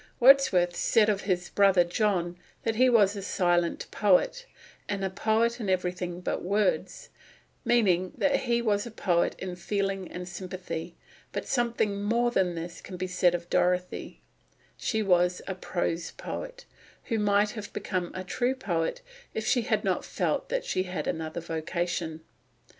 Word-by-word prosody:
Wordsworth 240 -10 +6
said 215 -1 +3
of 205 -1 +1
his 180 -1 0
brother 195 -3 +5
John 175 -1 0 0.3
that 225 -1 0
he 255 +1 +5
was 210 -4 +4
"a 200 - -4
silent 175 -3 +1
poet," 210 - +2 0.4
and 200 -1 -1
"a 190 - -2
poet 225 +4 +1
in 210 -4 -3
everything 180 -1 -1
but - - -2
words," 200 +1 0 0.5
meaning 185 -6 +3
that 280 -1 +3
he 235 -2 0
was 205 0 +1
a - - -6
poet 180 -6 +1
in 185 -1 -5
feeling 195 +1 -2
and 180 0 -6
sympathy; 180 -2 -6 0.4
but - - -4
something 235 -5 0
more 235 +3 +2
than 185 -6 +1
this 170 +1 -6
can 185 - -8
be 185 - -2
said 180 -1 +2
of 170 0 -5
Dorothy; 180 0 0 0.5
she 220 -1 -1
was 180 -2 +3
a 190 - -3
prose 175 -2 -2
poet, - - -7 0.4
who 225 -3 -1
might 205 0 +3
have 215 -3 -7
become 180 -3 -2
a 185 - -4
true 245 +7 0
poet, 170 -10 -2 0.3
if 220 - -2
she 245 - +3
had - - 0
not - - 0
felt - - -1
that - - -1
she 185 - 0
had 180 -5 -4
another 160 +1 -3
vocation. 165 0 -3
190 Hz, 160 wpm, -28 LUFS, 175-220 Hz, 0.5 s, Wordsworth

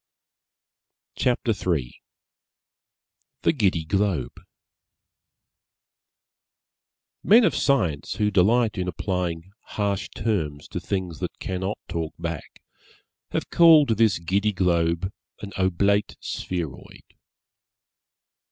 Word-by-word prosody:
CHAPTER 125 -2 +1
III 85 - -2 1.4
THE - - +4
GIDDY 95 - +1
GLOBE 100 +1 0 2.9
Men 230 +4 +6
of - - +2
Science, 90 - +1
who 105 -1 0
delight 105 +3 +3
in 90 - -2
applying 90 0 -3 0.3
harsh 100 -2 -1
terms 80 -10 -2
to - - -4
things 90 -5 -3
that - - -5
cannot 95 +2 -3
talk 80 -1 -4
back, 85 -3 -6 0.7
have - - -3
called 160 -5 +7
this 110 -3 +3
Giddy 100 +5 0
Globe 85 0 +1 0.3
an 100 - -6
Oblate 100 +2 +1
Spheroid. 85 -7 -5
95 Hz, 90 wpm, -24 LUFS, 85-105 Hz, 2.9 s, called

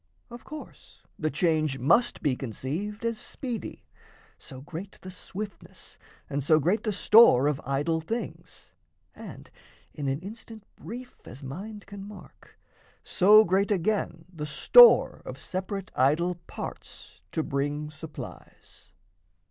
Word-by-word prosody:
Of 240 0 -10
course 305 0 -12 0.2
the 155 - 0
change 155 -2 +1
must 170 - +2
be 140 -4 +2
conceived 155 - -5
as 230 -1 -1
speedy; 245 -5 -6 0.5
So 130 - -11
great 175 +7 -8
the 185 - -9
swiftness 200 +3 -9 0.3
and 140 0 -3
so 155 +2 +4
great 185 +8 +1
the 215 - -1
store 200 - +6
Of 150 0 0
idol 145 +5 0
things, 225 +9 -7 0.4
and - - -11 0.4
(in 145 -3 -4
an 135 +1 -1
instant 220 +2 -10
brief 245 +2 -10
As 130 +5 -11
mind 200 +10 -8
can 200 -1 -9
mark) 205 0 -14 0.5
so 210 +3 +6
great, 195 +2 +1
again, 185 -4 -1
the 150 -3 -5
store 480 - +7
Of - - -8
separate 190 +1 -5
idol 155 +7 +2
parts - - -9
to 160 - 0
bring 145 +2 -2
supplies. 155 0 -11
175 Hz, 130 wpm, -27 LUFS, 150-210 Hz, 0.5 s, store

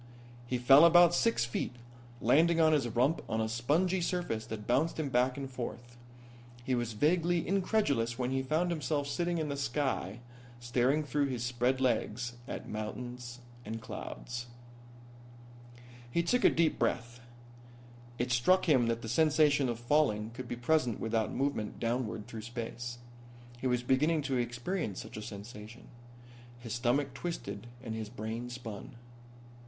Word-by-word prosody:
He 125 - 0
fell 135 +5 +7
about 175 0 +7
six 230 - +2
feet, 120 +1 -3 0.5
landing 165 +8 +4
on 160 -1 +5
his 140 -5 +2
rump 125 +7 +1
on 110 - 0
a 110 - +1
spongy 155 +12 +1
surface 170 -11 -2
that 105 -1 -6
bounced 155 +7 +1
him 150 -3 -1
back 125 +1 +2
and 140 -1 -4
forth. 120 -1 -7 0.7
He 130 +1 -1
was 120 -2 -1
vaguely 170 +7 +2
incredulous 170 - +1
when 125 0 -1
he 135 0 +1
found 155 +6 0
himself 150 -2 -1
sitting 175 +3 -1
in 155 -2 -2
the 140 - -2
sky 135 -6 -2 0.4
staring 125 +5 +1
through 145 0 0
his 125 -3 -3
spread 125 +2 +1
legs 120 -1 0
at - - -5
clouds 120 +3 -6 0.2
and 110 +1 -5
mountains. 120 +1 -6 1.6
He 170 +8 +1
took 245 +8 +1
a - - +8
deep 165 -1 +1
breath. 120 +1 -1 1.0
It 125 +1 -1
struck 180 +11 +3
him 130 -7 +4
that 115 0 -1
the - - -5
sensation 150 +1 +3
of 115 -1 -3
falling 120 -5 +1
could 125 +1 -7
be 120 - -3
present 120 -2 +1
without 110 -1 0
movement 135 -6 -2
downward 115 -2 -2
through 110 - -7
space. 120 +1 -5 0.6
He 130 - -1
was 125 -1 +1
beginning 150 +5 +2
to 135 -2 0
experience 120 - -2
such - - -9
a - - -5
sensation. 105 +2 -9 0.7
His 120 -2 -7
stomach 125 +3 +1
twisted 110 - -5 0.2
and 115 - -4
his 110 -1 -5
brain 115 +1 -5
spun. 120 -3 -8
125 Hz, 155 wpm, -32 LUFS, 115-150 Hz, 1.6 s, a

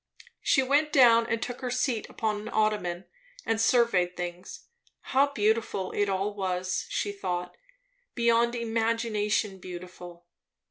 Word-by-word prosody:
She 270 - +3
went 290 +3 +2
down 235 -4 +6
and 230 -1 -1
took 245 +2 -5
her 255 - -3
seat 250 -2 -1
upon 215 -2 -2
an 220 - -7
ottoman, 210 -5 0 0.4
and 225 0 0
surveyed 225 -7 +2
things. 175 0 -7 0.4
How 270 +2 +2
beautiful 215 -5 0
it 205 -1 0
all 195 +2 -1
was, 185 -2 -2
she 205 - -1
thought; 180 -3 -4 0.6
beyond 235 0 +2
imagination 225 -3 -1
beautiful. 180 -1 -10
215 Hz, 130 wpm, -28 LUFS, 185-235 Hz, 0.6 s, down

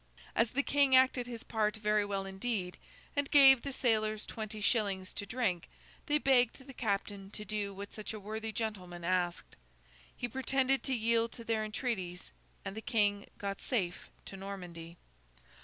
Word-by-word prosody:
As 230 0 +3
the 280 +4 0
King 280 -2 +4
acted 260 -1 +4
his 235 -2 -6
part 215 -1 0
very 210 -1 +2
well 200 -1 -2
indeed, 195 -1 -3 0.4
and 285 -1 0
gave 270 -3 +8
the 280 - -4
sailors 215 -4 +1
twenty 215 -1 -6
shillings 200 -4 +1
to 200 - -5
drink, 200 -8 -1 0.4
they 295 -1 +4
begged 265 -4 +3
the 270 - -10
captain 200 -4 -2
to 210 +1 -7
do 205 0 -2
what 200 +1 -8
such 215 - -5
a 215 - -6
worthy 220 +2 -4
gentleman 185 -6 -4
asked. 175 0 -1 0.6
He 245 - -2
pretended 265 +2 +1
to 265 - +1
yield 230 0 +2
to 230 - -9
their 225 -1 0
entreaties, 210 -5 -3 0.3
and 195 0 -4
the 220 - -5
King 205 -4 +1
got 200 0 -4
safe 185 -9 -2 0.2
to - - -8
Normandy. 175 -4 -8
215 Hz, 165 wpm, -33 LUFS, 195-245 Hz, 0.6 s, gave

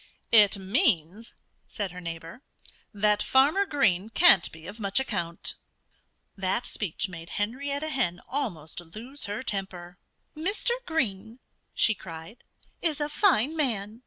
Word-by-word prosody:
"It 210 -2 +7
means," 195 - +1 0.3
said 205 -4 -4
her 180 0 -9
neighbor, 165 +5 -8 0.5
"that 210 0 +2
Farmer 300 +10 +3
Green 210 - +2
can't 350 +10 +6
be 160 0 -13
of 205 +5 -9
much 200 +2 +2
account." 175 -10 -2 0.8
That 195 +5 -1
speech 200 -2 -3
made 170 -2 -10
Henrietta 280 +8 -2
Hen 240 - -1
almost 195 - -4 0.2
lose 255 +6 -5
her 205 +4 -4
temper. 180 -5 -5 0.4
"Mr. 390 +9 +1 0.2
Green," 230 - -2 0.4
she 225 - +4
cried, 170 +3 -11 0.4
"is 315 -4 +1
a 295 0 -1
fine 310 - +2
man. 225 -7 -1
210 Hz, 130 wpm, -27 LUFS, 185-270 Hz, 0.8 s, It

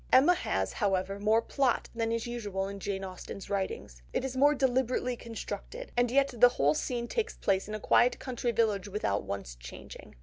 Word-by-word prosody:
Emma 285 +7 +7
has, 360 - -1
however, 195 -1 0
more 220 +3 +3
plot 270 -4 +1
than 230 -1 -1
is 230 -1 -1
usual 205 -5 -3
with 200 0 -6
Jane 195 0 -3
Austen's 190 +1 -8
writings, 190 - -3
it - - 0
is 265 -1 -4
more 290 +3 +5
deliberately 255 -1 +1
constructed, 235 - -7
and 245 0 +3
yet 275 +1 +2
the 245 +1 +7
whole 145 - +2
scene 240 +6 -2
takes 455 - -2
place 195 -1 +1
in 215 - -4
a - - -4
quiet 245 +4 +4
country 245 -2 -2
village 215 -4 +1
without 190 - -1
once 100 -11 -5
changing. - - -11
225 Hz, 190 wpm, -30 LUFS, 195-250 Hz, -, Emma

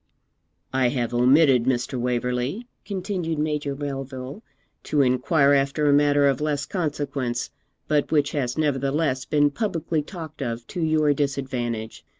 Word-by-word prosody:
'I 130 -1 +3
have 120 -2 -2
omitted, 130 0 +5
Mr. 125 0 -1
Waverley,' 125 - -1 0.2
continued 185 -5 -3
Major 150 -2 -1
Melville, 135 - -6 0.4
'to 145 -2 +1
inquire 140 +3 +3
after 140 +2 +1
a 145 - +5
matter 145 0 +4
of 135 0 +1
less 145 -2 -1
consequence, 140 -8 -2 0.4
but 150 -1 +1
which 145 -2 +2
has 125 -3 -2
nevertheless 140 -2 0
been 145 -1 +2
publicly 165 -4 -1
talked 160 -2 -9
of 120 -2 -3
to 175 - -4
your 155 -2 +3
disadvantage. 130 -5 -3
140 Hz, 135 wpm, -24 LUFS, 130-150 Hz, 0.4 s, omitted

